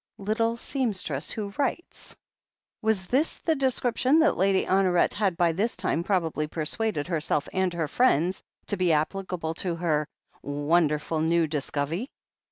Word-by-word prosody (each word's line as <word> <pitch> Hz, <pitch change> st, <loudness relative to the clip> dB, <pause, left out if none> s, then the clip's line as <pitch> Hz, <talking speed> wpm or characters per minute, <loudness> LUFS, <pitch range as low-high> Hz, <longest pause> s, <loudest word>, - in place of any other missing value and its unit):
Little 225 Hz, +3 st, 0 dB
seamstress 200 Hz, -, -2 dB
who 205 Hz, -2 st, -3 dB
writes! 285 Hz, +5 st, -3 dB, 0.7 s
Was 215 Hz, -4 st, +1 dB
this 270 Hz, -, +1 dB
the 325 Hz, -, 0 dB
description 260 Hz, 0 st, +1 dB
that 320 Hz, -1 st, +4 dB
Lady 190 Hz, +1 st, +2 dB
Honoret 185 Hz, -2 st, +3 dB
had 195 Hz, -5 st, 0 dB
by 175 Hz, -2 st, +3 dB
this 200 Hz, +7 st, -1 dB
time 180 Hz, -2 st, -1 dB
probably 165 Hz, -5 st, 0 dB
persuaded 155 Hz, +2 st, -2 dB
herself 155 Hz, -4 st, 0 dB
and 190 Hz, -1 st, +1 dB
her 165 Hz, -3 st, -1 dB
friends 185 Hz, -, +2 dB, 0.2 s
to 205 Hz, -, -2 dB
be 180 Hz, -3 st, +2 dB
applicable 165 Hz, +1 st, -2 dB
to 175 Hz, -3 st, -2 dB
her 155 Hz, -3 st, 0 dB, 0.3 s
"wonderful 150 Hz, +1 st, +1 dB
new 165 Hz, +1 st, +3 dB
discove'y" 150 Hz, -, -2 dB
180 Hz, 140 wpm, -26 LUFS, 160-215 Hz, 0.7 s, that